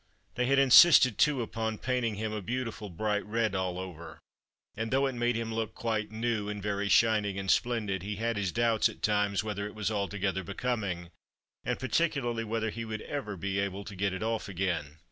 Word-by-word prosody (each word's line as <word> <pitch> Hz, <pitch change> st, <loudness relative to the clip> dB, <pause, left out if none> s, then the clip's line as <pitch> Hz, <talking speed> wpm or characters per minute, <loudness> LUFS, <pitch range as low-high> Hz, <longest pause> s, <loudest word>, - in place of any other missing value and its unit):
They 125 Hz, 0 st, 0 dB
had 135 Hz, +1 st, +3 dB
insisted, 135 Hz, -, +7 dB
too, 140 Hz, -5 st, +3 dB
upon 110 Hz, -1 st, -3 dB
painting 125 Hz, -3 st, -1 dB
him 110 Hz, +1 st, -3 dB
a 105 Hz, -, -3 dB
beautiful 115 Hz, 0 st, -4 dB
bright 105 Hz, +4 st, -1 dB
red 110 Hz, -1 st, -1 dB
all 95 Hz, -2 st, -1 dB
over, 85 Hz, -3 st, -8 dB, 0.6 s
and 110 Hz, +1 st, -3 dB
though 135 Hz, +3 st, +2 dB
it 135 Hz, -, -1 dB
made 120 Hz, 0 st, 0 dB
him 115 Hz, 0 st, -3 dB
look 110 Hz, -1 st, -3 dB
quite 110 Hz, -2 st, -2 dB
new, 110 Hz, -2 st, -1 dB
and 105 Hz, 0 st, -4 dB
very 100 Hz, 0 st, -2 dB
shining 105 Hz, -4 st, +3 dB
and 95 Hz, -1 st, 0 dB
splendid, 110 Hz, -6 st, 0 dB
he 105 Hz, +3 st, -4 dB
had 115 Hz, +2 st, -1 dB
his 100 Hz, -3 st, -1 dB
doubts 115 Hz, 0 st, +2 dB
at -, -, -13 dB
times 105 Hz, -1 st, +1 dB
whether 105 Hz, -1 st, -3 dB
it 105 Hz, -, -11 dB
was 105 Hz, 0 st, -1 dB
altogether 100 Hz, -2 st, -1 dB
becoming, 100 Hz, -4 st, -3 dB, 0.5 s
and -, -, -1 dB
particularly 130 Hz, -3 st, 0 dB
whether 110 Hz, 0 st, -2 dB
he 115 Hz, +2 st, -5 dB
would 110 Hz, -1 st, -5 dB
ever 120 Hz, -9 st, -4 dB
be 100 Hz, +2 st, -2 dB
able 100 Hz, 0 st, -2 dB
to 100 Hz, 0 st, -9 dB
get 100 Hz, +1 st, 0 dB
it 95 Hz, +3 st, -4 dB
off 110 Hz, -2 st, -2 dB
again. 85 Hz, -6 st, -2 dB
110 Hz, 200 wpm, -30 LUFS, 100-115 Hz, 0.6 s, insisted